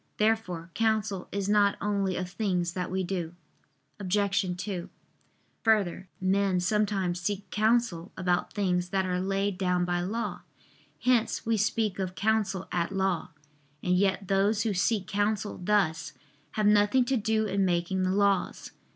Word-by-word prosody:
Therefore 200 -6 0
counsel 215 -4 0
is 200 -1 -2
not 205 -1 +3
only 200 -2 0
of 180 - -2
things 180 -3 -1
that 180 -1 -3
we 190 +1 -1
do. 175 -2 -3 0.6
Obj. 195 -1 0
2: 180 -1 -4 0.7
Further, 200 -5 +2
men 190 0 +2
sometimes 190 -2 0
seek 200 +2 -2
counsel 215 -5 +1
about 180 -1 0
things 180 -4 0
that 190 0 0
are 180 -1 -1
laid 195 0 -1
down 180 -2 +1
by 175 0 0
law; 215 +6 -3 0.6
hence 245 -3 +2
we 225 0 +2
speak 215 -2 0
of 185 -1 -3
counsel 205 -3 0
at 170 0 -1
law. 190 -2 0 0.5
And 180 0 +2
yet 195 0 +1
those 200 +2 +2
who 220 - 0
seek 195 +1 +1
counsel 205 0 -1
thus, 175 -5 +1 0.4
have 215 - 0
nothing 210 +4 +4
to 265 - +1
do 220 -1 +1
in 200 -1 0
making 180 +1 0
the 185 - +1
laws. 200 -1 +1
195 Hz, 150 wpm, -28 LUFS, 180-210 Hz, 0.7 s, nothing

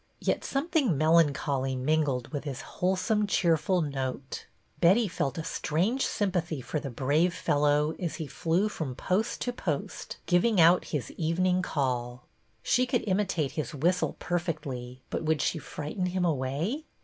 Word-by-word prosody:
Yet - - 0
some 275 +4 -1
thing 280 - +2
melancholy 140 -4 +2
mingled 135 -2 0
with 145 -2 -4
his 140 -3 -5
wholesome, 190 +3 0
cheerful 170 -1 +2
note. 135 -2 -4 0.3
Betty 195 +6 +5
felt 145 -6 -2
a 160 - -3
strange 185 - 0
sympathy 175 -6 -1
for 150 +4 -3
the 140 - -5
brave 145 +8 +1
fellow 150 -2 +2
as 175 -3 -2
he 160 - -4
flew 170 +6 0
from 155 -11 -4
post 190 - -1
to 245 - -1
post, 160 - -4
giving 180 +4 +3
out 170 +2 +6
his 140 -7 -3
evening 180 +3 +1
call. 125 -6 -2 0.4
She 255 0 +2
could 245 -2 0
imitate 185 -7 0
his 155 -1 -4
whistle 175 +6 +1
perfectly, 140 -8 -4
but - - -1
would 160 -1 +1
she 165 - 0
frighten 155 +5 -4
him 180 0 0
away? 160 - -1
160 Hz, 150 wpm, -28 LUFS, 140-185 Hz, 0.4 s, out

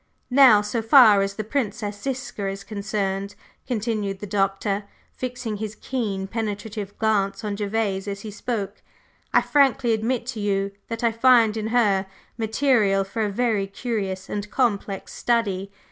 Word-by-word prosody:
Now, 250 -6 +7
so 210 +3 -2
far 225 -4 +7
as 195 0 -2
the 215 - -3
Princess 210 -4 -3
Ziska 255 -5 -4
is 195 0 -5
concerned," 200 -1 -3 0.3
continued 215 -4 -2
the 205 - -7
Doctor, 195 +1 -1 0.3
fixing 250 -4 -4
his 215 0 -5
keen, 215 -6 -3
penetrative 210 -1 -4
glance 205 -2 0
on 205 -1 -2
Gervase 205 -1 -1
as 200 0 -4
he 215 - -7
spoke, 210 -2 -4 0.5
"I - - +5
frankly 270 -4 +3
admit 230 +2 -1
to 225 - -7
you 200 -1 0 0.2
that 230 0 -5
I 235 - +3
find 230 -2 +5
in 220 -1 -2
her 210 -5 +2 0.3
material 220 -3 +2
for 195 +4 -4
a 210 - +1
very 210 -2 0
curious 195 -3 -3
and 205 0 -4
complex 205 -6 -1
study. 200 -5 0
210 Hz, 150 wpm, -24 LUFS, 200-230 Hz, 0.5 s, Now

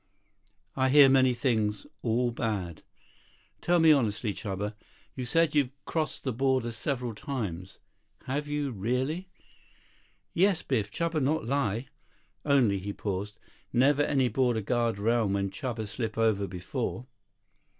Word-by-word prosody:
"I 130 0 +2
hear 140 0 +8
many 130 -1 +5
things. 110 -5 0 0.2
All 120 +2 +1
bad." 100 -8 -3 0.8
"Tell 175 0 +3
me 160 -1 +7
honestly, 110 -6 +1
Chuba. 100 +2 -4 0.4
You 130 - -4
said 165 +5 +2
you've 145 -4 +3 0.2
crossed 155 -3 -2
over 130 -1 +1
several 120 +1 -3
times. 105 - -5 0.5
Have 145 +3 -3
you, 145 -2 -2
really?" 130 - -2 1.0
"Yes, 190 0 +2
Biff. 110 -7 0
Chuba 165 +1 -1
not 150 +4 0
lie. 120 -3 0 0.6
Only," 125 -9 +3
he 100 +2 -5
paused, 100 +1 -4 0.3
"never 140 +4 +4
any 135 -3 +2
border 120 -1 +1
guard 115 +1 0
around 110 -1 +1
when 100 -1 -1
Chuba 115 -2 -4
slip 110 0 -4
over 110 -3 +2
before." 115 +7 -4
120 Hz, 130 wpm, -28 LUFS, 105-140 Hz, 1.0 s, hear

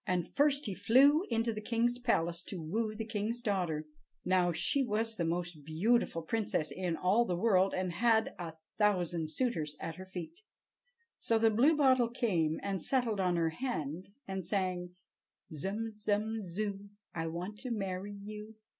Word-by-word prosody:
And 180 -2 0
first 285 0 +2
he 205 - -2
flew 270 - +5
into 230 -1 +1
the 215 - -5
king's 240 +2 0
palace 170 -8 +1
to 190 - -5
woo 215 +7 -2
the 225 +1 -4
king's 225 +2 -3
daughter. 180 -8 -1 0.4
Now, 180 -1 +3
she 275 - +2
was 225 -1 -1
the 175 - -1
most 170 -2 -3
beautiful 165 +3 +1
princess 200 -5 -1
in 180 -3 -2
all 195 +6 +3
the 180 -6 -1
world, 190 -1 +3
and 185 -1 -1
had 225 +4 +2
a 170 -2 -5 0.3
thousand 175 -6 +1
suitors 155 -6 -1
at 165 0 -5
her 185 - -8
feet. 185 - -7 0.8
So 225 - +2
the 225 0 +4
Bluebottle 260 0 +4
came 165 -10 +1
and 195 -3 -2
settled 240 -4 +1
on 180 -2 +2
her 165 -1 +1
hand, 170 - -4 0.2
and 190 -1 -3
sang: 180 -1 -2 0.6
"Zum, 205 +9 -3
zum, 215 +1 -1
zoo, 200 +2 -4 0.2
I 165 -1 -2
want 180 +6 -5
to 255 - -5
marry 195 -3 -3
you!" 210 +2 -9
200 Hz, 165 wpm, -32 LUFS, 175-225 Hz, 0.8 s, flew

